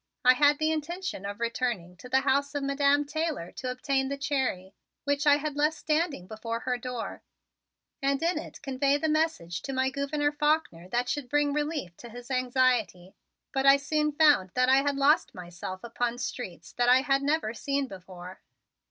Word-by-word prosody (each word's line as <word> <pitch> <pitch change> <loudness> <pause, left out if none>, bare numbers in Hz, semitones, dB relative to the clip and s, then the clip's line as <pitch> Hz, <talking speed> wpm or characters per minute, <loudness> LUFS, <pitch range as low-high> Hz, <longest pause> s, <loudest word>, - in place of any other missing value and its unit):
I 255 - +8
had 290 +2 +4
the 310 +1 +1
intention 320 - -4
of 205 +1 -6
returning 230 -7 -2
to 250 - -12
the 265 +1 +3
house 280 +1 +1
of 285 - -1
Madam 280 +1 +2
Taylor 300 - -3
to 255 - -5
obtain 270 +1 -1
the 280 - -3
Cherry, 265 -10 -2 0.3
which 285 +1 0
I 290 - +8
had 295 0 -3
left 300 +2 +1
standing 305 - -1
before 230 +3 -5
her 255 -1 -1
door, 245 -1 -5 0.8
and 275 0 +1
in 340 -1 +1
it 310 - -10
convey 275 +1 +1
the 315 - -1
message 305 - 0
to 270 - -5
my 260 0 +1
Gouverneur 290 +1 -1
Faulkner 295 - 0
that 245 +4 0
should 280 -2 -3
bring 290 0 +2
relief 295 - -2
to 240 - -11
his 245 +3 -10
anxiety, 245 -8 +1 0.4
but 270 0 +1
I 275 0 +8
soon 300 +2 0
found 295 -11 +4
that 255 0 +3
I 265 - +6
had 280 +1 +1
lost 280 +3 +3
myself 180 +1 -7
upon 240 0 -2
streets 245 -8 -6
that 245 0 +2
I 255 +1 +6
had 275 0 +2
never 285 -6 0
seen 275 +3 -1
before. 185 -2 -11
275 Hz, 185 wpm, -28 LUFS, 235-290 Hz, 0.8 s, I